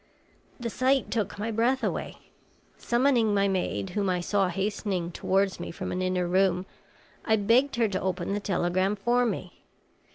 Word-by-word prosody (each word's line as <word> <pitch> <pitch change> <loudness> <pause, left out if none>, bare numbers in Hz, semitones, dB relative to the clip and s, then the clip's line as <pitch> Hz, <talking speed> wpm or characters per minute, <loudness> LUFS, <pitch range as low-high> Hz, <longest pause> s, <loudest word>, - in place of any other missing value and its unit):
The 235 -2 -3
sight 265 +3 +1
took 220 -3 -2
my 220 +3 -2
breath 240 +4 +1
away. - - -2 0.6
Summoning 240 -4 +2
my 200 0 +3
maid, 140 - -2
whom 200 -2 0
I 180 -1 +1
saw 195 +2 +1
hastening 190 -1 -2
towards 195 +2 0
me - - -5
from - - -5
an 180 - -2
inner 185 -1 0
room, 185 0 +2 0.6
I 220 - +3
begged 235 +7 +3
her 235 -2 +2
to 190 - -2
open 185 0 -2
the 205 - 0
telegram 185 0 0
for 240 +4 +2
me. - - -5
200 Hz, 165 wpm, -27 LUFS, 185-230 Hz, 0.6 s, my